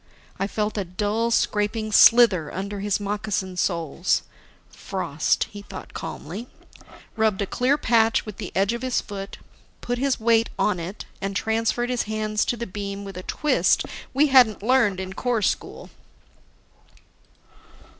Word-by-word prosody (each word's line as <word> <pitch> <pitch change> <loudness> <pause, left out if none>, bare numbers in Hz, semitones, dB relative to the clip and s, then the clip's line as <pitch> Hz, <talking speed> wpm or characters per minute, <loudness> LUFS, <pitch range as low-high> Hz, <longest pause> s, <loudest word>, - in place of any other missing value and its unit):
I 195 - 0
felt 210 0 -2
a - - 0
dull, 210 +5 -1
scraping 215 -1 0
slither 210 -8 +6
under 200 +2 -4
his 205 0 0
moccasin 205 -2 -3
soles. 170 -1 0 0.5
"Frost," - - -1
he 205 - -8
thought 195 -2 -10
calmly, 195 +11 -6 0.7
rubbed 220 -3 +1
a 200 - 0
clear 255 +8 +1
patch 225 -4 +2
with 215 -3 -8
the - - -6
edge 195 +4 +2
of 235 - -4
his 255 -1 0
foot, 195 0 -7 0.4
put 245 0 -3
his 275 -1 +1
weight 230 0 +3
on 195 -4 +1
it, 180 +5 -6 0.2
and 195 0 -3
transferred 225 +3 0
his 245 - 0
hands 215 0 0
to 240 - -1
the 235 - -4
beam 200 0 -6
with 195 -2 -8
a 180 - -5
twist 300 +10 +2 0.3
we 280 +3 +4
hadn't 245 -7 +5
learned 230 -6 +3
in 190 0 -5
Corps 235 0 -1
school. - - -2
210 Hz, 150 wpm, -24 LUFS, 195-230 Hz, 0.7 s, slither